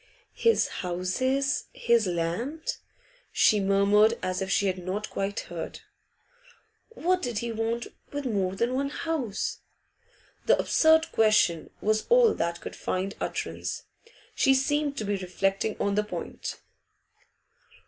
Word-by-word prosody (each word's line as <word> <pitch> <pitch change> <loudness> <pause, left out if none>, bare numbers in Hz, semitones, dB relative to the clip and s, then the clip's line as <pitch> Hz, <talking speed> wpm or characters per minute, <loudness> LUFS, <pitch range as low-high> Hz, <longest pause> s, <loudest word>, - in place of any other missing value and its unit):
'His 460 0 +3
houses 255 +11 0
his 235 -3 +2
land?' 180 - -2 0.5
she 215 - +4
murmured, 200 +3 +4
as 185 +1 -1
if 190 - -2
she 200 - +2
had 185 -1 0
not 195 +4 -3
quite 200 +2 -2
heard. - - -7 1.1
'What 365 -5 0
did 240 -4 -3
he 235 +2 -2
want 225 +1 -2 0.3
with 285 -1 -4
more 195 -6 0
than 235 +5 0
one 275 +2 0
house?' 285 -10 -3 0.9
The - - +6
absurd 320 0 +4
question 215 -7 +3
was 215 +1 +1
all 480 -2 +6
that 170 0 -2
could - - -7
find 190 +2 -2
utterance. - - -3 0.5
She 270 -1 +4
seemed 290 +1 0
to 215 - -2
be 200 0 0
reflecting 195 +3 -1
on 200 - +1
that 210 +1 0
point. - - -5
215 Hz, 130 wpm, -27 LUFS, 195-270 Hz, 1.1 s, The